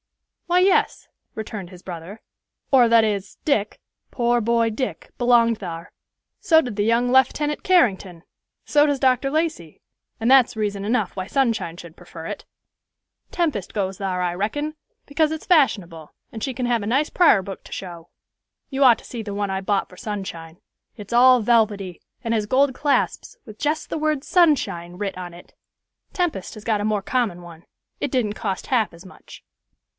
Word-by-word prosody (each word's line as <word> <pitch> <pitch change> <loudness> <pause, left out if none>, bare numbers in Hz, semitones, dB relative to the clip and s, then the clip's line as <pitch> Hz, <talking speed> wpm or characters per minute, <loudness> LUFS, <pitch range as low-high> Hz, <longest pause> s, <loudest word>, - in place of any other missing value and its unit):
"Why, 355 +1 +3
yes," 380 +1 +2 0.3
returned 210 -4 -6
his 180 -1 -14
brother; 180 +4 -8 0.5
"or, 250 -4 +6
that 230 -1 +5
is, 200 -2 -3
Dick, 220 -8 0 0.3
poor 240 -1 +1
boy 230 +1 +2
Dick, 255 +4 -5
belonged 235 -2 +3
thar; 170 -3 -7 0.5
so 320 -2 +5
did 245 -9 -3
the 205 - 0
young 235 +3 +2
Leftenant 265 +4 +2
Carrington; 195 - +2 0.4
so 295 0 +4
does 285 -2 0
Dr. 260 +1 +2
Lacey; 310 - -2 0.4
and 225 +2 0
that's 260 -4 +5
reason 205 -2 -2
enough 215 -2 -1
why 185 -1 -4
Sunshine 230 -10 0
should 170 -2 -11
prefer 170 -2 -11
it. - - -6 0.8
Tempest 300 - -2
goes 195 -3 -2
thar, 185 -2 -2
I 175 -1 -1
reckon, 290 - -3 0.3
because 305 +2 +1
its 315 0 -5
fashionable, 190 - +1 0.2
and 220 - -6
she 265 - -2
can 250 0 -3
have 235 -3 0
a - - -4
nice 275 +6 +1
prar 320 - +5
book 195 0 -8
to - - -15
show. 170 -3 -8 0.6
You 275 0 0
ought 245 -3 +7
to - - -16
see 235 - -6
the 205 -2 -6
one 200 -1 -2
I 190 0 -2
bought 195 0 0
for 185 - -17
Sunshine. 175 -6 -6 0.4
It's 210 +1 -8
all 250 +1 +6
velvety, 210 -5 +1 0.2
and 230 -1 -1
has 215 -2 0
gold 265 +3 +3
clasps, 290 - -1
with 215 -3 -12
jest 300 +1 -1
the - - -3
word 305 -2 0
'Sunshine' 265 - +1
writ 200 -2 -4
on 180 -1 -7
it. 175 - -15 0.6
Tempest 345 - -2
has 215 - -11
got 215 -3 +1
a - - -2
more 210 -2 0
common 220 -7 -1
one. 170 -1 -13 0.4
It 285 - -2
didn't 235 -6 0
cost 195 -3 -4
half 230 -8 +1
as 170 +3 -14
much." 185 - -15
220 Hz, 180 wpm, -22 LUFS, 190-265 Hz, 0.8 s, ought